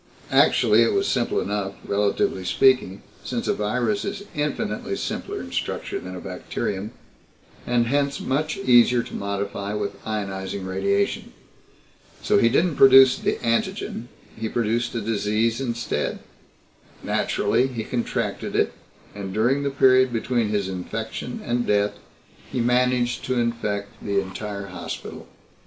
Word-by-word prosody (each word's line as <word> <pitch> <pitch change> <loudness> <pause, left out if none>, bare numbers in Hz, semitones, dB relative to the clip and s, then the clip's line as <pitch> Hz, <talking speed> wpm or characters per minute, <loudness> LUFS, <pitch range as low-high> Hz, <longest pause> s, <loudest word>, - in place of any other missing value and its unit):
Actually, - - +5
it - - +3
was 395 0 +1
simple 120 - +1
enough, 100 -1 -2
relatively 100 -2 0
speaking, 100 0 +2 0.2
since - - -3
a - - +3
virus 120 - 0
is 200 0 -4
infinitely 150 -7 -2
simpler - - -4
in - - -8
structure - - -3
than 95 0 -8
a - - -6
bacterium, 95 +2 -4 0.8
and 120 -1 +2
hence 140 +3 0
much 155 +4 -1
easier 125 -8 +5
to - - -11
modify 100 0 -3
with 100 -1 -4
ionizing 100 -2 -4
radiation. 100 +2 -1 0.9
So - - +3
he 115 - +5
didn't 160 +5 +2
produce 135 -1 +8
an - - 0
antigen 115 0 -1 0.3
he 110 0 -3
produced 120 +1 -1
a 115 - -1
disease 110 +2 0
instead. 120 -2 -2 0.9
Naturally, 130 - +1
he 120 -4 -4
contracted 120 +1 -2
it, - - +2 0.4
and 100 -2 -6
during 120 +8 +2
the 140 - 0
period 130 -2 +4
between 115 -1 0
his 100 -2 0
infection 90 -2 -5
and 120 0 0
death 105 0 +2 0.6
he - - -2
managed 125 0 +2
to 130 -1 0
infect 105 -4 -2
the 100 -1 +1
entire 100 +1 -5
hospital. 85 -3 -7
115 Hz, 135 wpm, -24 LUFS, 100-125 Hz, 0.9 s, produce